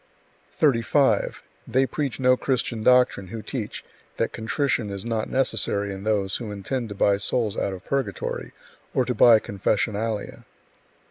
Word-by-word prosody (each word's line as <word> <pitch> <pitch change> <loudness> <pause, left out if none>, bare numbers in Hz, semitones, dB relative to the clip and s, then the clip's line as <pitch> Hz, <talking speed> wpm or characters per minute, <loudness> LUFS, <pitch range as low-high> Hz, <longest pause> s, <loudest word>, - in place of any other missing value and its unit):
35. 130 -4 +2 0.2
They 130 +3 +2
preach 135 -3 -3
no 130 0 +5
Christian 125 -3 -1
doctrine 125 -5 +4
who 110 +3 -7
teach 115 -7 -5 0.3
that - - 0
contrition 115 0 -1
is 100 0 -6
not 115 -2 -2
necessary 105 -6 0
in 95 +1 -8
those 100 -3 +1
who 115 -3 -6
intend 115 +4 -3
to 105 - -6
buy 100 0 +3
souls 105 +1 0
out - - -1
of 95 -1 -8
purgatory 130 -9 -3 0.4
or - - +3
to - - -1
buy 115 -2 +7
confessionalia. 105 +2 -2
110 Hz, 145 wpm, -24 LUFS, 100-125 Hz, 0.4 s, buy